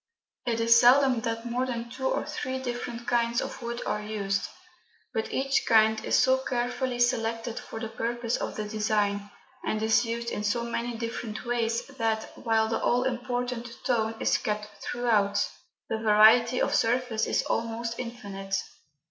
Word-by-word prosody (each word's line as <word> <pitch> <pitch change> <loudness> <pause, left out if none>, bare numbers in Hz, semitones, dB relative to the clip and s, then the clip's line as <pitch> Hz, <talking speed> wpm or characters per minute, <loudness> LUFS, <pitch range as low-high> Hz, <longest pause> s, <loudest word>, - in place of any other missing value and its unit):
It 230 -1 +1
is 230 +1 +6
seldom 255 0 +6
that 230 -1 -3
more 245 +2 -1
than 235 -2 -3
two 265 +2 -2
or - - 0
three 260 -3 -3
different 240 -2 -5
kinds 235 0 +2
of - - -5
wood 235 0 -4
are 210 - -1
used, 200 -2 -2 0.7
but 220 - -2
each 275 +1 +1
kind 220 -1 +4
is - - +2
so 260 0 +4
carefully 245 0 -2
selected 230 -1 0
for 225 - -8
the 225 - -3
purpose 235 +1 -2
of - - -4
the 215 - -3
design, 210 -1 0 0.3
and 215 - -1
is 220 +2 +4
used 235 0 -3
in 210 - -3
so 215 +3 0
many 235 0 -3
different 230 -1 -5
ways, 235 -1 0
that, 225 -5 -2
while 220 -1 +1
the 225 - -1
all 245 +1 +2
important 245 -1 -2 0.2
"tone" 225 -3 +1
is - - +2
kept 210 0 -3
throughout, 210 -4 +1 0.4
the 220 - -2
variety 225 +3 +6
of - - +1
surface 235 -1 +1
is - - +1
almost 230 0 -2
infinite. 200 -5 -5
230 Hz, 165 wpm, -28 LUFS, 220-245 Hz, 0.7 s, is